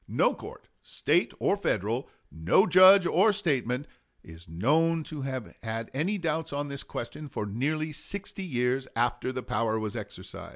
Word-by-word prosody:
No - - +2
court, - - -11
State - - +1
or - - +2
Federal, - - -1 0.2
no 80 - +3
judge 185 -1 +8
or 195 +5 +4
statesman, 140 - 0 0.4
is 80 0 -14
known 155 - +2
to 150 -1 -7
have 130 -4 -5
had 115 0 -4
any 175 +10 0
doubts 160 -3 -2
on 145 0 -3
this 140 -1 -5
question 150 +6 -6
for 105 - -4
nearly 150 +9 -2
sixty 195 +5 -6
years 130 -4 -1
after 120 +2 0
the 130 -1 -5
power 110 +1 0
was 110 -2 -4
exercised." - - -8
140 Hz, 160 wpm, -28 LUFS, 115-165 Hz, 0.4 s, judge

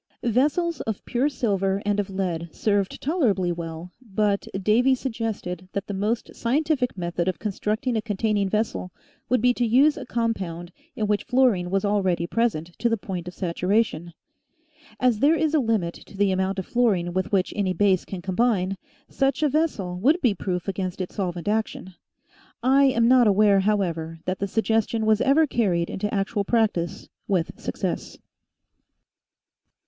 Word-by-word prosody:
Vessels 295 +8 +1
of 220 -3 -4
pure 260 +4 +1
silver 195 -7 0
and 205 0 +1
of 200 - -2
lead 175 -4 -3
served 200 0 0
toler 305 -3 +2
ably 185 -3 0
well, 165 0 -6
but 205 -3 -1
Davy 235 +7 +3
suggested 220 -8 -4
that 200 - -2
the 205 - -5
most 210 +4 -2
scientific 265 -1 0
method 175 0 -2
of 185 - 0
constructing 220 +4 -2
a 220 - +1
containing 205 -1 0
vessel 210 -3 -1 0.4
would 250 -2 +2
be 250 0 +5
to 245 - -1
use 265 +6 +4
a - - -6
compound 185 -7 -2 0.2
in 215 - -1
which 210 0 0
fluorine 240 -9 +2
was 195 +2 0
already 190 -4 +1
present 175 -5 -1
to 235 - +2
the 230 - +1
point 185 -3 -6
of 180 - -7
saturation. 180 -1 0 0.9
As 245 -4 +2
there 300 +6 +4
is 315 0 0
a 310 - +4
limit 220 -9 0
to 195 - -13
the 200 -1 +3
amount 190 +1 0
of 190 - -3
fluorine 200 -8 +1
with 185 0 -1
which 195 -2 +1
any 200 -3 0
base 185 0 +2
can 185 -3 -7
combine, 195 -1 +1 0.3
such 275 +2 0
a 300 - +4
vessel 235 - -1
would 295 - +3
be 245 - +2
proof 180 -1 -3
against 190 -2 -3
its 185 - -4
solvent 180 -3 -3
action. 210 -3 -2 0.7
I 270 +2 +5
am 235 -4 +3
not 250 -2 +6
aware, 205 0 +5
however, 175 -5 -1
that 185 0 -2
the 200 - -1
suggestion 225 +1 0
was 215 0 +3
ever 290 +4 +4
carried 190 - 0
into 210 +2 -3
actual 200 +1 -1
practice 205 -6 0 0.2
with 180 -4 -1
success. - - -4
205 Hz, 165 wpm, -24 LUFS, 185-235 Hz, 0.9 s, not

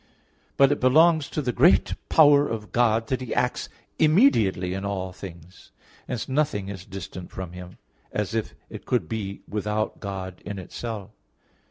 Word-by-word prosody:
But 140 0 +6
it 145 - 0
belongs 155 +4 +4
to 150 - -3
the 125 - 0
great 150 +10 +4 0.2
power 145 -2 +6
of 110 -2 -5
God 115 -2 +2
that 130 -1 -1
He 125 - -4
acts 125 0 0 0.3
immediately 115 - +4
in 95 +1 -4
all 95 -2 -3
things. 85 -2 -12 0.4
Hence 115 - -3
nothing 130 -8 0
is 95 -2 -7
distant 95 -2 -8
from 95 -2 -7
Him, 90 0 -10 0.3
as 105 -1 -2
if 115 -1 -2
it - - -10
could 115 -10 +1
be 100 0 -4
without 105 +1 -2
God 95 -2 -6
in 100 -1 -6
itself. 105 +2 -6
105 Hz, 160 wpm, -25 LUFS, 95-130 Hz, 0.4 s, But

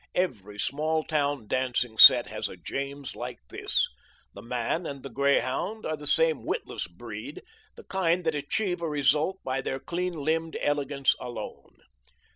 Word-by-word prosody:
Every 105 - -2
small 155 +7 -1
town 145 -6 -1
dancing 125 -3 -1
set - - +10
has - - -4
a - - -10
James 140 0 -5
like - - -6
this. - - +2 0.5
The 100 - -10
man 125 - -2
and 140 -2 -7
the 135 - -8
greyhound 140 - 0
are 155 - -1
the 150 -1 -5
same 160 -1 +5
witless - - -4
breed, 110 +5 -9 0.3
the - - -12
kind 180 -1 0
that 160 -1 0
achieve 175 +5 -2
a 165 - -2
result 150 +5 +1
by 130 +1 -2
their 135 0 -3
clean 180 +5 -3
limbed 160 +1 -1
elegance 140 -2 +1
alone. 125 -1 -8
145 Hz, 155 wpm, -27 LUFS, 130-160 Hz, 0.5 s, set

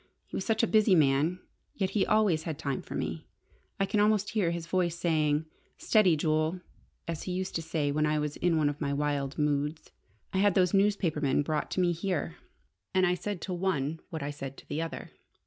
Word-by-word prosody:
He - - -9
was - - -2
such 225 +2 +1
a - - +4
busy 215 -3 +4
man, 150 +4 +2 0.3
yet 190 0 -2
always 210 -7 +3
he - - -13
had 160 -3 -3
time 140 -4 -2
for - - -8
me! - - -4 0.5
I 195 - +3
can 210 - 0
almost 210 0 +2
hear 210 -6 +1
his 170 -1 -3
voice 175 -1 0
saying, 155 -3 +1 0.3
'Steady, 190 -7 +4
Jule!' 155 +3 +1 0.5
as 165 -2 -3
he - - -1
used 185 +1 -3
to - - -3
say 155 -3 -1
when 150 +1 +1
I 150 0 +1
was 150 -1 -2
in 170 -2 +2
one 150 -2 +3
of 145 +1 -3
my 140 -1 0
wild 145 -1 -1
moods. 150 +1 -1 0.4
I 190 - +1
had 205 -1 +3
those 180 -2 +3
newspapermen 180 -9 +2
brought 150 0 -2
to - - -1
me 175 -1 +3
here. 165 - -2 0.6
And 185 0 +5
I 180 - +3
said 185 0 -4
to 185 - -4
one 165 -4 -1
what 160 -3 -5
I 145 - -3
said 135 -2 -7
to - - -14
the 155 - -2
other. 165 0 -6
165 Hz, 215 wpm, -29 LUFS, 150-185 Hz, 0.6 s, And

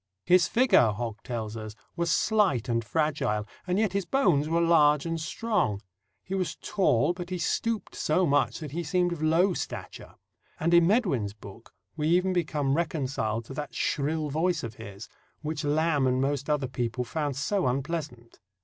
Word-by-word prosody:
"His 180 -1 +5
figure," 220 - +4
Hogg 115 0 -5
tells 115 -4 -5
us, 110 -1 -7 0.2
"was 170 0 -1
slight 200 - +2
and 115 -1 0
fragile, 135 -6 -1 0.2
and 180 +1 +1
yet 210 -3 +1
his 195 -3 -1
bones 165 - +2
were 165 +1 +2
large 150 -3 +4
and 165 -1 -2
strong. 180 - -1 0.4
He 185 - -7
was 185 -2 -1
tall, 175 - +1
but 175 0 -7
he 185 - -2
stooped 225 +5 -1
so 180 +4 +1
much 145 -2 +2
that 150 -3 -6
he 170 +4 -3
seemed 175 +2 +1
of 160 - -7
low 165 +5 +3
stature." - - -7 0.4
And, 170 +2 +1
in 170 -1 +6
Medwin's 175 - +1
book, 105 +2 -13 0.2
we 155 -1 -1
even 180 +3 +3
become 150 -6 0
reconciled 130 -8 -1
to 135 - -9
that 145 +1 -6
shrill 150 +1 -1
voice 165 +2 0
of 115 -2 -5
his, 100 +2 -9 0.4
which 155 0 -3
Lamb 150 -1 +2
and 130 0 +1
most 140 +1 -1
other 145 -3 +1
people 125 -1 -2
found 145 +2 -3
so 185 +5 0
unpleasant. 135 -2 -4
155 Hz, 175 wpm, -27 LUFS, 130-175 Hz, 0.4 s, in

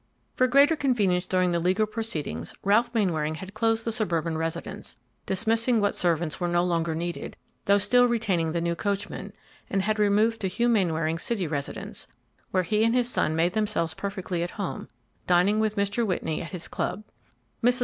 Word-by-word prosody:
For 255 - +3
greater 280 +5 +5
convenience 205 - +1
during 185 -1 +2
the 170 - +1
legal 185 +5 +2
proceedings, 190 - -4
Ralph 215 +5 +3
Mainwaring 165 -9 0
had 190 +5 -9
closed 225 0 +1
the 230 - 0
suburban 170 -8 -1
residence, 165 +1 -4 0.3
dismissing 225 +4 +2
what 205 -1 +1
servants 170 -3 0
were 175 - 0
no 175 0 +2
longer 170 -2 0
needed, 170 +1 -4 0.3
though 200 +1 +5
still 245 +5 +4
retaining 200 -9 0
the 170 +1 -1
new 170 0 0
coachman, 200 +3 -3 0.4
and 195 -1 0
had 215 +1 0
removed 210 +2 +3
to 195 - +1
Hugh 235 +6 0
Mainwaring's 165 -7 +1
city 215 -6 -1
residence, 145 -3 -4 0.4
where 185 -1 +1
he 210 +5 +1
and 230 +2 +3
his 245 -1 +2
son 155 -8 +1
made 170 +2 +2
themselves 210 -7 0
perfectly 190 -3 -4
at 175 - -1
home, 200 -3 -4 0.4
dining 180 +4 +4
with 215 -1 +1
Mr. 200 +3 0
Whitney 175 -6 -1
at 170 - -6
his 180 -3 -6
club. 210 - -3 0.6
Mrs. 245 +2 +3
195 Hz, 180 wpm, -26 LUFS, 170-220 Hz, 0.6 s, greater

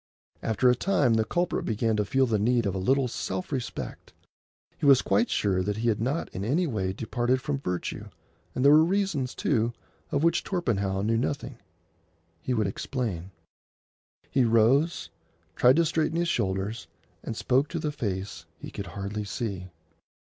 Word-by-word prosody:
After 110 +3 +1
a 125 - +7
time 140 -6 +2
the 110 0 +3
culprit 175 +9 -1
began 110 0 0
to 105 - +1
feel 130 +6 +2
the 110 -4 0
need 120 +2 +2
of 100 - 0
a 95 - -2
little 130 +7 +2
self 95 -4 -4
respect. 130 -4 -5 0.7
He 145 - +1
was 135 -2 +7
quite 240 - +2
sure 95 -3 +1
that 100 +2 -2
he 115 +2 +1
had 110 -1 0
not 140 +8 -1
in 95 - -5
any 150 - +1
way 100 - -1
departed 120 +5 0
from 140 +1 -2
virtue, 90 -9 -4 0.5
and 125 - 0
there 140 - +8
were 155 +1 +7
reasons, 175 -8 0
too, 120 -4 +1 0.4
of 145 +1 +1
which 170 0 +3
Torpenhow 100 - -1
knew 115 +2 +1
nothing. 130 0 -3 0.8
He - - -3
would 110 -4 +1
explain. 95 -3 -3 1.0
He 135 - +3
rose, 115 - +3 0.4
tried 125 +1 +5
to 170 +1 +3
straighten 160 0 0
his 170 0 +1
shoulders, 95 - -2 0.3
and 115 - -5
spoke 135 +3 +2
to 170 - -4
the 150 -2 -2
face 100 -7 -4
he - - -9
could 100 - -6
hardly 100 +4 -4
see. 100 -4 -4
120 Hz, 170 wpm, -27 LUFS, 100-140 Hz, 1.0 s, there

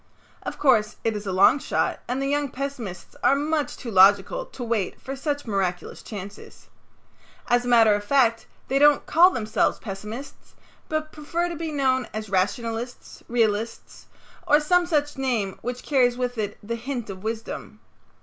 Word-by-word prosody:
Of - - -6
course, 225 -7 +3
it 225 -1 0
is 205 -1 -5
a - - -1
long 190 +9 +5
shot - - -1
and 250 +2 -2
the 275 - -1
young 290 0 0
pessimists 250 -9 -6
are 275 - +5
much 300 +1 -1
too 235 - -7
logical 200 - +4
to 250 - -8
wait 225 -5 -2
for 270 - -6
such 290 +1 -3
miraculous 190 -5 -2
chances. 200 -1 -10 0.8
As 245 0 +2
a - - -4
matter 230 -3 +6
of 205 0 -1
fact, 230 -2 +2 0.2
they 270 +1 +1
don't 295 0 +5
call 345 +3 +6
themselves 220 - 0
pessimists, 215 +6 -8 0.3
but 310 0 -2
prefer 335 +3 -2
to 340 - -5
be 325 0 -4
known 260 -3 +1
as 215 -2 -5
rationalists, 225 +5 -2
realists, 225 -1 -1 0.4
or 295 - +6
some 350 +3 +2
such 295 -4 0
name 230 -8 -1
which 245 +1 -5
carries 250 -4 +2
with 250 -2 -2
it 205 -1 -3
the 225 +3 -4
hint 240 -3 -5
of 185 -1 -9
wisdom. 225 +2 -5
245 Hz, 170 wpm, -24 LUFS, 215-285 Hz, 0.8 s, matter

